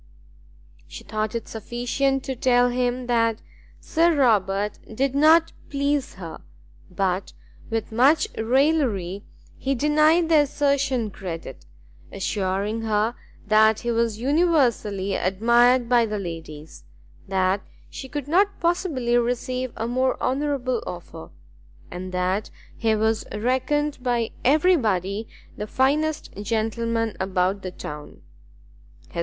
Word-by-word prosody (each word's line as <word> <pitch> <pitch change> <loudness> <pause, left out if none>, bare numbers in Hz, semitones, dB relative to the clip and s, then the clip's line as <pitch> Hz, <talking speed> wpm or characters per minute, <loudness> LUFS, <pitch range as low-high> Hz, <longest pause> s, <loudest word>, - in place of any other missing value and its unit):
She - - -10
thought 215 +1 -3
it 230 - -4
sufficient 245 +4 -1
to 265 - -4
tell 245 0 +3
him 250 0 -1
that 230 -2 +1 0.4
Sir 335 0 +2
Robert 210 -6 +1
did 265 +4 0
not 320 +3 +5 0.2
please 280 0 -1
her, 165 -4 -8 0.5
but, 185 +1 -2 0.4
with 225 -1 -3
much 275 - +4
raillery, 225 - +1 0.3
he 270 +1 -1
denied 305 +5 +3
the 320 -2 +5
assertion 280 -5 +1
credit, 165 - -8 0.4
assuring 195 +2 -2
her 220 +1 0 0.3
that 220 0 +4
he 240 - -1
was 230 -2 0
universally 250 - +1
admired 235 +7 +3
by 235 -1 +3
the 210 0 -3
ladies, 160 - -8 0.4
that 190 0 +1 0.3
she 265 - -9
could 290 -1 -5
not 395 +6 +2
possibly 330 -9 0
receive 250 +1 -2
a 225 - -3
more 255 +2 0
honourable 260 -3 -1
offer, 170 - -8 0.6
and 185 +1 -6
that 185 +3 -1 0.3
he 225 -2 +1
was 220 +1 +1
reckoned 260 +7 0
by 240 -2 0
every 310 +8 +4
body 205 - -1 0.3
the 210 - -4
finest 295 +6 0
gentleman 225 +1 -1
about 190 +1 0
the 185 - -5
town. 150 -4 -9
235 Hz, 115 wpm, -24 LUFS, 200-275 Hz, 0.6 s, not